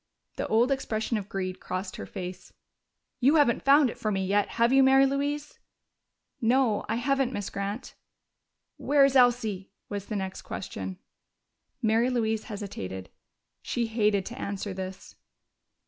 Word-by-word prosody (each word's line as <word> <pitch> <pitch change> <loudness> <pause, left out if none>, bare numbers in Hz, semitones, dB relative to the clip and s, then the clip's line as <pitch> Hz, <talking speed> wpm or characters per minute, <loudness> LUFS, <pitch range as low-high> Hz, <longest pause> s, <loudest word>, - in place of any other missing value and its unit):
The - - -2
old 235 +4 +3
expression 230 -4 -1
of 200 0 -9
greed 185 -1 -3
crossed 185 +1 -5
her - - -7
face. 180 0 -7 0.7
"You 275 +5 +4
haven't 285 -7 +4
found 280 +1 +6
it - - -13
for 215 - -1
me 195 -1 0
yet, 205 +2 +2
have 235 +2 +4
you, 270 - +7
Mary 270 +1 +6
Louise?" 285 +2 -2 0.8
"No, 235 -2 +2
I 220 - +1
haven't, 270 +1 +1
Miss 205 -6 -4
Grant." 200 +4 -4 0.8
"Where 285 -1 +4
is 275 -1 +1
Elsie?" 235 -6 +3 0.2
was 200 -1 -5
the 215 - -4
next 190 -1 -4
question. 95 - -6 0.9
Mary 225 +3 +3
Louise 220 -3 0
hesitated: 95 - -6 0.5
she 240 - -1
hated 210 -3 +1
to 240 +4 -7
answer 200 -2 -4
this. 190 0 -7
220 Hz, 145 wpm, -28 LUFS, 195-260 Hz, 0.9 s, you